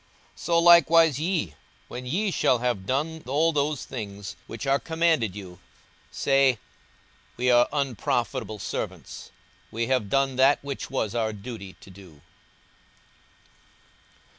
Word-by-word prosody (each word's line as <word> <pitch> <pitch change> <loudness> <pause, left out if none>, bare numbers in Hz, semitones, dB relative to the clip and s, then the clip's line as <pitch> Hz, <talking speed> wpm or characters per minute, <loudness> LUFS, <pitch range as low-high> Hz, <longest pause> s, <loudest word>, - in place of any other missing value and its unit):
42:017:010 - - -32
So 170 +1 +1
likewise 165 -3 +6
ye, 170 +1 -1 0.3
when 125 +1 -7
ye 195 +9 0
shall 130 - +2
have 120 -6 -2
done 155 +5 -2
all 155 +5 +2
those 145 -2 -1
things 100 -6 -7
which 115 +4 -7
are 135 +1 +2
commanded 160 - 0
you, 90 -4 -10 0.5
say, 135 -3 +2 0.8
We 125 +1 +2
are 120 0 +5
unprofitable 120 -6 -2
servants: - - -6 0.4
we 115 +1 -2
have 125 -5 0
done 135 0 +1
that 135 +2 +5
which 140 -1 -5
was 110 -6 -2
our 110 -2 -1
duty 100 -3 -8
to 95 - -14
do. 90 -6 -16
130 Hz, 130 wpm, -25 LUFS, 110-150 Hz, 0.8 s, likewise